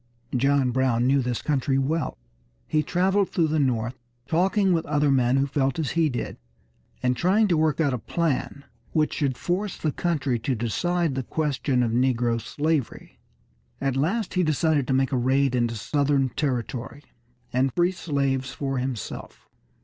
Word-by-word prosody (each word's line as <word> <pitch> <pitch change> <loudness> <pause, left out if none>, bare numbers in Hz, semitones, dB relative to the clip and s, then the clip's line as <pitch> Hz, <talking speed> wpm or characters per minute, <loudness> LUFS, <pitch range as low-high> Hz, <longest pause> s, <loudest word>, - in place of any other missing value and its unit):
John 135 0 +2
Brown 125 -2 +1
knew 135 +1 +3
this 125 -1 -2
country 135 -2 +1
well. 145 +3 -1 0.5
He 155 - +2
traveled 190 +4 +1
through 165 -3 +1
the 155 0 +1
North, 125 -2 0 0.3
talking 190 +3 +2
with 165 -1 +1
other 145 -1 +2
men 130 -1 +3
who 135 - +2
felt 135 -2 0
as 155 -5 -1
he 165 -1 +2
did, 125 - -4 0.7
and 125 0 +2
trying 195 - +3
to 175 - +3
work 155 -1 +1
out 145 -5 +2
a 125 - -2
plan 140 0 -2 0.3
which 155 -1 +1
should 140 -5 -1
force 185 +7 -2
the 155 - -1
country 140 -7 -1
to 125 +3 -1
decide 165 +8 0
this 130 -1 -3
question 140 -4 0
of 115 - 0
negro 120 -1 +1
slavery. 150 +2 -2 0.6
At 135 -1 -1
last 180 +10 0
he 185 - +2
decided 155 -3 +1
to 135 - +1
make 135 0 +2
a 130 - +1
raid 130 +2 +2
into 120 -2 0
Southern 140 +3 +1
territory, 130 +1 -3 0.5
and 130 +2 +2
free 175 +7 +2
slaves 140 -7 -1
for 135 -1 -2
himself. 125 -4 -6
140 Hz, 165 wpm, -25 LUFS, 125-160 Hz, 0.7 s, knew